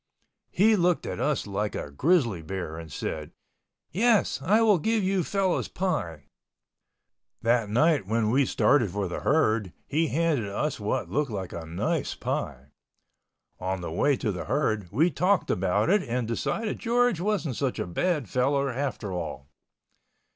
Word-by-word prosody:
He 215 +4 +4
looked 180 -2 +1
at - - -4
us 150 -3 0
like 105 +1 -2
a 70 - -5
grizzly 120 - +2
bear 80 -1 -5
and 80 -1 -9
said, 75 +1 -5 0.6
"Yes, 225 +2 +2
I 215 +4 +3
will 210 -5 +4
give 220 +4 +1
you 190 -1 +1
fellows 195 0 0
pie." 85 - -3 1.2
That 115 -2 +2
night 145 - +2
when 110 0 +1
we 135 +1 +3
started 120 -8 +3
for 100 +1 -2
the 85 - -4
herd, 110 - +1
he 160 +3 +1
handed 155 -8 0
us 140 +8 -2
what 110 +5 -2
looked 150 -1 0
like 95 -5 -5
a 85 -1 -6
nice 85 +2 -2
pie. 65 +3 -4 0.9
On 95 0 -2
the 85 - -5
way 140 - +2
to 110 -4 -1
the 90 - -5
herd 110 - -1
we 155 - +3
talked 185 +6 +1
about 95 +3 +1
it 205 0 +4
and 125 -4 -2
decided 210 - -2
George 240 -4 +2
wasn't 190 - -1
such 135 0 -1
a - - -2
bad 145 - -1
fellow 140 +4 +1
after 125 -6 -3
all. 80 -5 -5
125 Hz, 160 wpm, -27 LUFS, -, 1.2 s, He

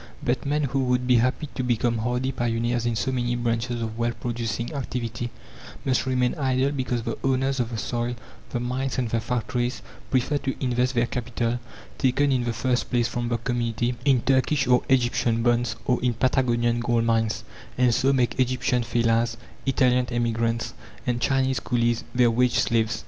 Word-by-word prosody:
But 125 +2 -1
men, 150 +1 +1
who 135 0 0
would 125 0 +1
be 125 -1 +5
happy 130 +6 +1
to - - -2
become 120 -1 +1
hardy 125 +3 -1
pioneers 120 0 0
in 120 - 0
so 130 - 0
many 120 -1 0
branches 120 0 -1
of 110 0 -5
wealth 120 0 -1
producing 120 +2 -3
activity, 120 -4 -3 0.6
must 130 -1 +1
remain 125 -1 +2
idle 130 0 +1
because 130 -4 -2
the 115 - -4
owners 135 0 +1
of 120 -2 0
the 115 - -4
soil, 120 +2 -2 0.3
the 120 - -2
mines 130 +2 -2
and 120 -3 -1
the 115 - +1
factories 125 +1 -2 0.3
prefer 135 +3 +1
to 135 -1 -2
invest 125 0 0
their 120 0 +3
capital 120 0 -2 0.4
taken 140 +2 +2
in 125 -2 +1
the 120 - 0
first 125 +2 0
place 120 -2 +2
from 120 -1 -3
the 120 - +1
community 120 0 -1
in 135 -4 +4
Turkish 135 +2 +2
or 125 0 +4
Egyptian 120 -3 +2
bonds, 120 -1 +2
or 125 -3 +1
in 120 -2 +1
Patagonian 120 -1 +2
gold 120 -1 +1
mines, 115 -1 +1 0.3
and 125 -1 +4
so 135 +4 +3
make 130 -2 +1
Egyptian 125 0 +1
fellahs, 115 0 +1 0.3
Italian 125 -2 +3
emigrants, 115 -1 -1 0.3
and 120 -2 -1
Chinese 130 -1 +2
coolies 120 0 0
their 120 -1 +5
wage 125 +1 +2
slaves. 110 -1 +1
120 Hz, 175 wpm, -25 LUFS, 115-130 Hz, 0.6 s, be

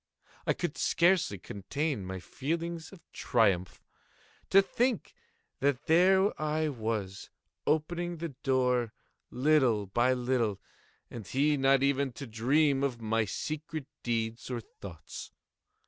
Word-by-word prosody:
I - - +4
could - - -4
scarcely 170 - +3
contain 105 - -3
my 95 0 -5
feelings 165 - -4
of 195 -4 -14
triumph. 100 -7 +1 0.7
To 195 - +7
think 235 +4 0 0.5
that 140 -1 0
there 190 +3 +4
I 155 0 0
was, 110 -6 -4 0.4
opening 175 +3 0
the 165 +1 -4
door, 125 -4 0 0.4
little 130 -6 +3
by 120 +6 +2
little, 120 -5 0 0.5
and 110 -5 -8
he 145 +3 +2
not 135 -1 +3
even 140 -1 +1
to 140 - -7
dream 135 +5 +2
of 135 -4 -1
my 115 0 0
secret 155 +7 -4 0.2
deeds 115 0 -2
or 125 -2 -2
thoughts. 95 -6 -10
135 Hz, 120 wpm, -30 LUFS, 115-155 Hz, 0.7 s, To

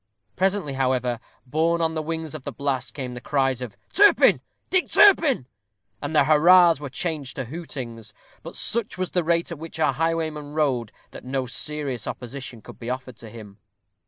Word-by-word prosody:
Presently, 190 -6 0
however, 130 -3 0 0.3
borne 160 +5 +1
on 165 -1 +1
the 160 - -2
wings 160 0 -4
of 155 - -6
the - - -6
blast, 140 -2 -2
came 130 -3 -5
the 125 - -8
cries 135 -3 0
of 120 -5 -7 0.2
"Turpin! 410 +1 +6 0.3
Dick 370 -1 +2
Turpin!" 320 - +5 0.6
and 150 +2 -4
the 150 - +6
hurrahs 165 +2 +6
were 145 -2 -6
changed 145 -1 -3
to 135 - -3
hootings; 120 -7 -7 0.3
but - - -9
such 230 -3 -1
was 185 -1 -2
the 180 - +1
rate 170 +1 +1
at 170 - -6
which 160 0 -8
our 155 - +3
highwayman 155 -1 -2
rode, 130 -8 0 0.2
that - - -10
no 130 0 -2
serious 135 -2 -3
opposition 125 -2 -7
could - - -12
be 115 - -6
offered 130 -2 -5
to 115 - -11
him. 105 -2 -12
145 Hz, 180 wpm, -24 LUFS, 125-165 Hz, 0.6 s, Turpin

